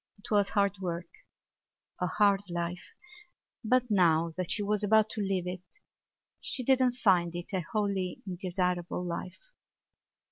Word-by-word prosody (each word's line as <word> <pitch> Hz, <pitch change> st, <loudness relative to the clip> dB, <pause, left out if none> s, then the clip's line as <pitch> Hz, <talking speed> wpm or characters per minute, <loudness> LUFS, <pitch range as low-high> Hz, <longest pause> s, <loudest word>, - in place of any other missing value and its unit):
It 205 Hz, -, -13 dB
was 205 Hz, -2 st, +3 dB
hard 200 Hz, -1 st, +1 dB
work—a 175 Hz, 0 st, -8 dB
hard 200 Hz, 0 st, +2 dB
life—but 240 Hz, -, -4 dB
now 165 Hz, -4 st, +3 dB
that 185 Hz, -2 st, -3 dB
she 210 Hz, -, 0 dB
was 210 Hz, 0 st, 0 dB
about 215 Hz, +1 st, +4 dB
to 215 Hz, -, -3 dB
leave 190 Hz, -3 st, -1 dB
it 180 Hz, 0 st, -4 dB, 0.8 s
she 255 Hz, -, -3 dB
did 265 Hz, +1 st, +4 dB
not 250 Hz, -1 st, +2 dB
find 180 Hz, -7 st, +2 dB
it 175 Hz, +3 st, -7 dB
a 185 Hz, -, +1 dB
wholly 200 Hz, -4 st, -1 dB
undesirable 180 Hz, -1 st, -2 dB
life. 180 Hz, -, -6 dB
195 Hz, 135 wpm, -30 LUFS, 175-210 Hz, 0.8 s, about